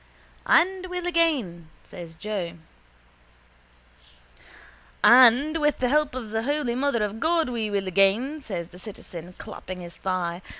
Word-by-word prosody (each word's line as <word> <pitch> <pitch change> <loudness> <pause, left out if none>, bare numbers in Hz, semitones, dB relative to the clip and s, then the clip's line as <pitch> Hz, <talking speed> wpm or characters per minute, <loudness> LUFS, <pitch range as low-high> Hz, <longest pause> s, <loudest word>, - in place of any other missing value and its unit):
—And 370 +2 +3
will 360 -1 -5
again, 280 - 0
says 170 -3 -10
Joe. 190 -2 -4 2.5
—And 260 +5 +6
with 295 -1 +1
the 250 - 0
help 300 0 +1
of 230 -5 -6
the 220 0 -1
holy 285 -1 -1
mother 255 -3 0
of 210 +1 -4
God 325 0 +1
we 225 -3 -2
will 200 -2 -2
again, 200 - +2
says 180 - -6
the 180 - -14
citizen, 180 -4 -10
clapping 185 0 -8
his 170 -1 -11
thigh. 180 -2 -3
225 Hz, 135 wpm, -25 LUFS, 185-295 Hz, 2.5 s, And